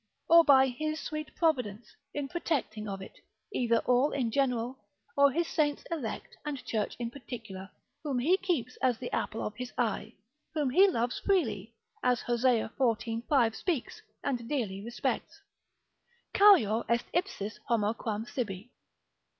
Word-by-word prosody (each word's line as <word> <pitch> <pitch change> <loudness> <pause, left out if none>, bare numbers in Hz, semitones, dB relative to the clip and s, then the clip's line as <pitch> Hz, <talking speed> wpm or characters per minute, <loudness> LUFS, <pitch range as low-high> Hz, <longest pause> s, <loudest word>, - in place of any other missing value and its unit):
Or 335 0 +8
by 270 -3 +7
His 310 +5 -3
sweet 305 0 -5
Providence, 245 - 0 0.2
in 290 -1 -3
protecting 260 -10 -2
of 195 -1 -5
it; - - -13 0.3
either 235 -6 +2
all 250 +4 +3
in 245 -5 0
general, 250 -1 0 0.4
or 280 0 +6
His 335 +4 0
saints 295 -2 0
elect 280 -10 -4
and 290 -3 -5
church 215 -2 -1
in 235 -1 -4
particular, 220 -8 -8 0.3
whom 285 -4 -2
He 305 +10 +4
keeps 325 - -2
as 255 -3 +2
the 245 0 -6
apple 225 - -2
of 210 - -4
His 250 -1 -5
eye, 220 -2 -1 0.4
whom 290 -4 +1
He 385 +9 +7
loves 245 -9 0
freely, 230 - 0 0.3
as 250 -1 +2
Hosea 240 -2 +2
xiv. 230 -2 0
5. 240 -6 +3
speaks, 335 -10 -2 0.2
and 245 -4 -2
dearly 205 -9 -2
respects, 235 +2 -3 1.0
Charior 310 - +6
est 235 0 +2
ipsis 335 - -2
homo 220 -2 +2
quam 220 -2 -3
sibi. 225 -3 -4
245 Hz, 150 wpm, -30 LUFS, 225-290 Hz, 1.0 s, Or